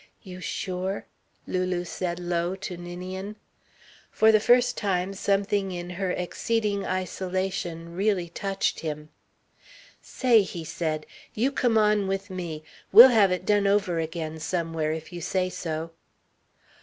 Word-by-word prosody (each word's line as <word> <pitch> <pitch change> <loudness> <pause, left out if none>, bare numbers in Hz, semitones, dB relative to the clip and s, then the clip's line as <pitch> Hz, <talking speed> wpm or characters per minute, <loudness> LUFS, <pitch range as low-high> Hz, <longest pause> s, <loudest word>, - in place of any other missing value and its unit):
"You 185 -2 -9
sure?" 185 +2 -3 0.4
Lulu 185 -1 -1
said 175 0 -3
low 175 +1 -1
to 190 -1 -6
Ninian. 185 +3 -6 0.7
For 220 0 +5
the 215 - +5
first 245 +3 +4
time, 190 -2 -1
something 200 0 0
in 175 0 -5
her 185 +1 -2
exceeding 200 +3 -1
isolation 185 -2 -3
really 195 -2 +1
touched 195 +3 -2
him. 150 -1 -5 0.9
"Say," 240 -4 +3
he 180 -4 -5
said, 155 -1 -3 0.3
"you 250 +6 +1
come 245 -4 +2
on 210 -2 +3
with 195 +1 -3
me. 170 -4 -5 0.3
We'll 235 +6 +11
have 210 -6 +4
it 180 0 -2
done 205 -1 +3
over 195 -4 +2
again 160 -1 -4
somewhere, 165 -2 -1
if 160 +2 -6
you 175 - -6
say 185 +2 -1
so." 165 -1 -4
185 Hz, 135 wpm, -26 LUFS, 170-200 Hz, 0.9 s, We'll